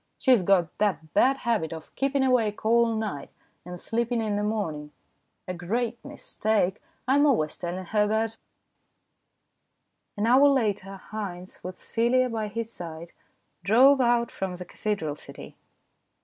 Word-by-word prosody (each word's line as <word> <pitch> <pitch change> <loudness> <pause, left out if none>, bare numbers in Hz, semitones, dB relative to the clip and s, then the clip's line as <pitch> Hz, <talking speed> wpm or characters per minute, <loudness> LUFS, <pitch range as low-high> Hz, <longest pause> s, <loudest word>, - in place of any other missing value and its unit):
She 260 - +2
has 245 -6 +6
got 180 -3 +2
the 205 -4 +2 0.2
bad 270 +1 +4
habit 225 - -1
of 160 -1 -9
keeping 275 0 0
awake 230 -6 +1
all 230 0 +3
night, 205 -11 -4 0.3
and 180 0 -8
sleeping 235 +3 -1
in 215 -2 -1
the 205 - 0
morning. 165 -9 -3 0.6
A 185 - -3
great 225 +7 -3
mistake. 215 -8 -1 0.3
I'm 285 +3 +4
always 155 - +1
telling 180 +1 -5
her 210 +2 +2
about 220 +1 0
it." - - -10 1.8
An 205 - 0
hour 260 +5 +6
later 205 -7 0
Haynes, 185 -4 -6
with 180 0 -7
Celia 250 +2 +1
by 220 -2 -2
his 230 +2 -5
side, 170 -1 -8 0.5
drove 260 +8 +6
out 235 -1 +2
from 190 -2 -4
the 180 0 -8
cathedral 175 -6 -3
city. - - -12
215 Hz, 150 wpm, -26 LUFS, 180-235 Hz, 1.8 s, has